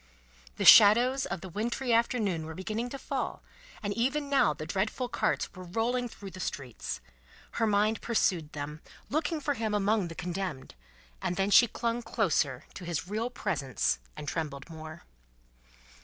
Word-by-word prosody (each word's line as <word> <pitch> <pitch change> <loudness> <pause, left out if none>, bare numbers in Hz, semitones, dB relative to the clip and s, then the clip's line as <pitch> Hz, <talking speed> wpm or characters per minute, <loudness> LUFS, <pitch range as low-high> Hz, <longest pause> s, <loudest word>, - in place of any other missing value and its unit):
The - - -1
shadows 240 +5 +8
of 175 -1 -4
the 190 - -7
wintry 235 +6 -1
afternoon 215 -8 +1
were 160 - -7
beginning 215 +6 -3
to 275 - -6
fall, - - -4 0.4
and 205 0 -1
even 280 +6 0
now 270 - +4
the 155 +1 -6
dreadful 210 +8 -1
carts - - -1
were 185 -1 -9
rolling 235 +7 -1
through 200 -3 -10
the 185 - -10
streets. 125 - -5 0.5
Her 225 - 0
mind 210 +1 +2
pursued 180 -9 0
them, 150 +1 -6 0.3
looking 315 +2 0
for 290 0 0
him 220 -4 -1
among 205 -1 +2
the 165 - -8
Condemned; 175 -6 -4 0.5
and 175 - -1
then 195 +2 0
she 240 +3 +8
clung 235 +1 -2
closer 155 - 0
to 185 - -9
his 175 0 -3
real 220 +4 -2
presence 140 - -1 0.2
and 145 - -7
trembled 150 -1 -4
more. 160 0 -9
200 Hz, 160 wpm, -30 LUFS, 165-235 Hz, 0.5 s, shadows